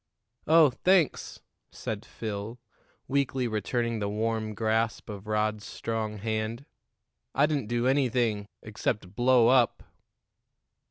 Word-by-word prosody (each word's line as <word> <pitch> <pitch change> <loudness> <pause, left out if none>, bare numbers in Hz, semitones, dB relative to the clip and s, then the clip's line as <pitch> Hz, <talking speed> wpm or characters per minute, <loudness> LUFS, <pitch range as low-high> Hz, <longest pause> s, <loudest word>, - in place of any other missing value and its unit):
"Oh, 160 -3 +6
thanks," 175 +5 +1 0.3
said - - -5
Phil, 110 +2 -5 0.5
weakly 135 -2 0
returning 115 +1 -1
the 100 -1 -1
warm 110 0 -2
grasp 110 0 0
of 100 0 -9
Rod's 110 0 0
strong 110 -2 -4
hand. 110 +4 -3 0.7
"I 140 - +5
didn't 145 -7 -1
do 120 +1 0
anything 120 -6 +1 0.2
except 105 -3 -3
blow 120 0 +4
up." 125 -2 +3
115 Hz, 110 wpm, -28 LUFS, 110-125 Hz, 0.7 s, Oh